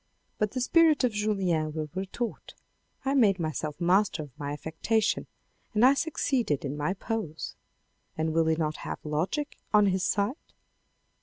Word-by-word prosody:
But 210 -1 0
the 255 - -1
spirit 315 +2 +4
of 250 - +3
Julien 190 -7 0
will 155 -2 -4
retort, 195 +5 -4 0.2
" - - -38
I 270 - +2
made 215 -8 +4
myself 155 -2 -3
master 185 -1 +2
of 145 - -12
my 145 -1 -4
affectation 205 +9 0 0.5
and 215 +4 +6
I 265 - +7
succeeded 265 - 0
in 140 +1 -3
my 150 +6 -1
pose." 200 -7 -4 0.6
And 160 0 0
will 165 0 +3
he 160 - +3
not 155 -1 -1
have - - -5
logic 175 - -2
on 210 -1 +6
his 190 -1 +1
side 205 +4 +1
190 Hz, 160 wpm, -28 LUFS, 155-225 Hz, 0.6 s, I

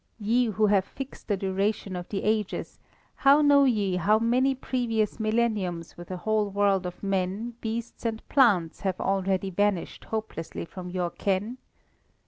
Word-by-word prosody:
Ye 230 +4 +2
who 215 0 +1
have 200 -2 +3
fixed 270 +5 -9
the 205 - +1
duration 195 +1 -1
of 175 -1 -6
the 195 - -3
Ages, 215 -2 -1 0.4
how 280 +2 +5
know 285 -1 +6
ye 205 -7 +1
how 205 +5 +3
many 250 +4 +2
previous 235 -5 -1
millenniums 215 -7 -1
with 175 0 -11
a 185 - -4
whole 215 +2 0
world 195 -2 +2
of 180 - -9
men, 195 +4 -1
beasts, 230 +1 -4
and 225 -1 -3
plants 195 - +3
have 190 -2 -2
already 195 0 0
vanished 205 -1 -1
hopelessly 215 -8 -5
from 180 +1 -8
your 180 -1 -2
ken? 205 +6 -2
205 Hz, 155 wpm, -27 LUFS, 190-225 Hz, 0.4 s, know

